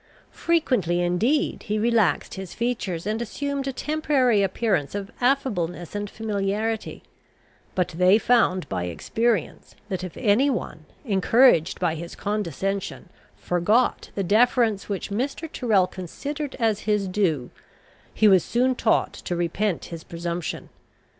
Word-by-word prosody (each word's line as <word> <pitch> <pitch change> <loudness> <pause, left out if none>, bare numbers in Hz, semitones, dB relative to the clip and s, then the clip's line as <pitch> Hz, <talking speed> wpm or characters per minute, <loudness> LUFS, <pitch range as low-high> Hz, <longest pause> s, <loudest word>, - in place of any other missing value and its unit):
Frequently 250 - +1
indeed 225 - +1
he 210 0 0
relaxed 220 -7 +2
his 190 -2 -7
features, 225 -8 -2
and 215 +2 -1
assumed 280 +4 -3
a - - 0
temporary 270 -6 +1
appearance 195 -5 0
of 200 -1 -5
affableness 200 - 0
and 205 0 -3
familiarity; 215 +1 -2 0.7
but 180 -1 +1
they 180 +4 +4
found 225 -6 +2
by 90 -2 -2
experience, 220 - -2
that 185 -2 -3
if 185 - -7
any 250 +4 +3
one, 160 - -4 0.2
encouraged 200 - +4
by 175 -3 +1
his 170 +1 -7
condescension, 200 -1 -3 0.3
forgot 205 +8 +1
the 195 - -1
deference 220 +1 +2
which 200 0 -3
Mr. 275 +9 -2
Tyrrel 220 -11 +2
considered 280 - -6
as 220 -3 +1
his 210 -2 +1
due, 175 -10 0 0.6
he 215 - +3
was 190 -4 +6
soon 255 +2 +1
taught 225 -3 +1
to 175 - -5
repent 175 +3 -1
his 165 -1 -7
presumption. 170 0 -5
205 Hz, 130 wpm, -24 LUFS, 180-240 Hz, 0.7 s, was